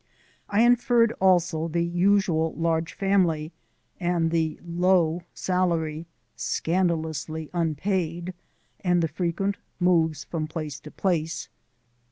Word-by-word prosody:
I 205 +2 +3
inferred 240 -1 +4
also 175 -3 +3
the 170 +1 0
usual 175 -2 +2
large 165 0 0
family 175 -6 +1 0.5
and 175 -2 +1
the 160 -2 0
low 175 -1 +2
salary 170 -3 -1 0.3
(scandalously 160 -3 -1
unpaid) 170 +1 -1 0.5
and 180 -3 +2
the - - +2
frequent 180 +5 -2 0.2
moves 165 -4 +2
from 155 -2 -4
place 155 -3 -5
to 150 - -11
place. 165 -2 -1
170 Hz, 105 wpm, -25 LUFS, 160-185 Hz, 0.5 s, inferred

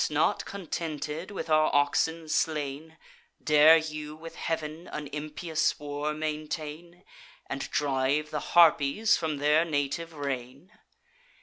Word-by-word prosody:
not - - +1
contented 165 -3 -5
with 190 -5 -5
our 155 -1 +4
oxen 160 +3 +1
slain, 155 0 -2 0.5
Dare 155 +1 +7
you 155 -1 -5
with 165 +1 -10
Heav'n 160 +1 -4
an 150 - -6
impious 155 +1 -1
war 145 +1 -3
maintain, 155 +3 -5 0.4
And 135 - -4
drive 145 +1 0
the 150 +2 -5
Harpies 170 +5 +5
from 155 -3 -2
their 150 +3 +3
native 160 +1 -2
reign? 140 +2 -5
155 Hz, 115 wpm, -28 LUFS, 145-160 Hz, 0.5 s, Dare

